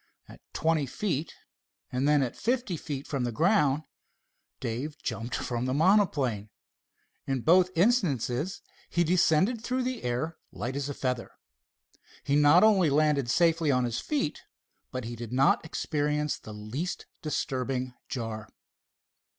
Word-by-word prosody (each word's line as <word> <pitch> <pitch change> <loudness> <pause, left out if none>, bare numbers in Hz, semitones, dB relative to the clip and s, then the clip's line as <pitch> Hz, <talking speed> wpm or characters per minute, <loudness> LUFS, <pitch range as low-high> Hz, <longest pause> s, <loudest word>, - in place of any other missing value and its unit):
At - - -14
twenty 160 -3 +1
feet, 160 +1 -2 0.6
and 130 +3 0
then 150 -2 +4
at 125 - -3
fifty 240 -6 -1
feet 145 -3 -5
from 135 -4 -2
the 120 - -1
ground 155 - +2 0.8
Dave 130 +7 -4
jumped 115 +2 -3
from 120 0 -2
the 130 - 0
monoplane. 145 - +2 0.8
In 135 -2 -1
both 180 +6 +5
instances 170 - +1 0.3
he 175 - +2
descended 180 +6 +3
through 255 +1 -1
the 255 -1 -3
air 125 +7 -2
light 125 +2 -4
as 140 0 -2
a 145 - -4
feather. 125 -2 -2 0.9
He 140 - +1
not 150 +5 +6
only 195 -7 +5
landed 145 -3 +2
safely 165 +2 +3
on 125 -2 +3
his 120 -1 -1
feet, 285 - -2 0.5
but 130 -1 -4
he 120 +1 -5
did 120 -1 -7
not 130 +2 +3
experience 150 -1 -1
the 110 - -10
least 110 +12 -5 0.2
disturbing 130 -4 -2 0.2
jar. 110 -4 -4
145 Hz, 140 wpm, -28 LUFS, 125-170 Hz, 0.9 s, not